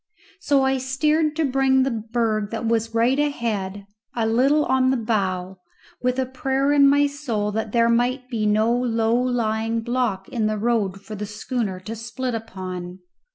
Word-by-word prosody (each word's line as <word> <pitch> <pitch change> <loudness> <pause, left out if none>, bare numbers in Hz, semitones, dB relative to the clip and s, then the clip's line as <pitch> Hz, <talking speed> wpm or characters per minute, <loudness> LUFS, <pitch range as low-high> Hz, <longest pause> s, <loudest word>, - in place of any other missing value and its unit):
So 285 -7 +2
I 265 0 +1
steered 300 +4 +1
to 320 -1 +1
bring 265 -1 +3
the 270 - 0
berg 220 -2 -1
that 230 +1 -4
was 225 0 0
right 245 +5 +3
ahead 210 -9 -2 0.3
a 230 -2 0
little 270 +7 +3
on 260 0 +2
the 265 - +2
bow, 190 -5 -2 0.4
with 250 0 0
a 260 - +1
prayer 270 +2 0
in 280 -1 +6
my 285 +1 +4
soul 250 -8 -2
that 220 0 -3
there 230 0 +3
might 245 +2 +1
be 225 -4 -1
no 215 +3 +3
low 230 -2 +1
lying 230 -2 0
block 235 -5 -1
in 225 -3 -1
the 215 0 -1
road 205 -4 0
for 215 - -9
the 210 0 -5
schooner 210 -2 -3
to 215 +5 -6
split 240 +3 -4
upon. 185 -5 -6
230 Hz, 175 wpm, -23 LUFS, 215-260 Hz, 0.4 s, in